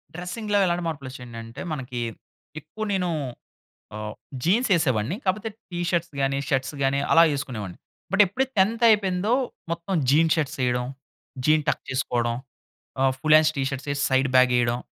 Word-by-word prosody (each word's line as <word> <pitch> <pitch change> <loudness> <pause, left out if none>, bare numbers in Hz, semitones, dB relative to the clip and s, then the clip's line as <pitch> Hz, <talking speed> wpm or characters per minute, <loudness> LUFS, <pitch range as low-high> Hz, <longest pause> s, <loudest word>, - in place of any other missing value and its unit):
డ్రెస్సింగ్‌లో 205 +4 -2
ఎలాంటి 175 -1 0
మార్పులోచ్చాయండంటే, 125 -6 -7
మనకి 125 -3 -5 0.6
ఎక్కువ 215 +9 -7
నేను 180 -2 0 0.9
ఆహ్, 105 0 -5 0.3
జీన్స్ 220 +7 +2
ఏసేవాడ్ని 135 - 0
కాపోతే 210 +4 0 0.2
టి 175 - -4
షర్ట్స్ 170 -3 -1
గాని, 135 0 +1
షర్ట్స్ 135 +2 0
గాని 135 +1 +2
అలా 165 - +7
ఏసుకునేవాడిని. 110 -10 -5 0.3
బట్, 200 +1 +5
ఎప్పుడైతే 260 +8 -2
10థ్ 225 +5 +2
అయిపోయిందో 205 -1 +2 0.4
మొత్తం 170 +3 -3 0.2
జీన్ 160 +3 +4
షర్ట్స్ 150 -4 -2
ఏయడం, 125 0 0 0.6
జీన్ 155 0 +4
టకేసుకోవడం, 120 -3 -1 0.6
ఆహ్, 135 0 +4
ఫుల్ 155 +1 +3
హాండ్స్ 155 0 +3
టి 135 - +1
షర్ట్స్ 135 +1 -5
ఏసి 140 - -3
సైడ్ 130 +1 +3
బ్యాగేయడం. 120 -2 +4
150 Hz, 140 wpm, -25 LUFS, 130-180 Hz, 0.9 s, అలా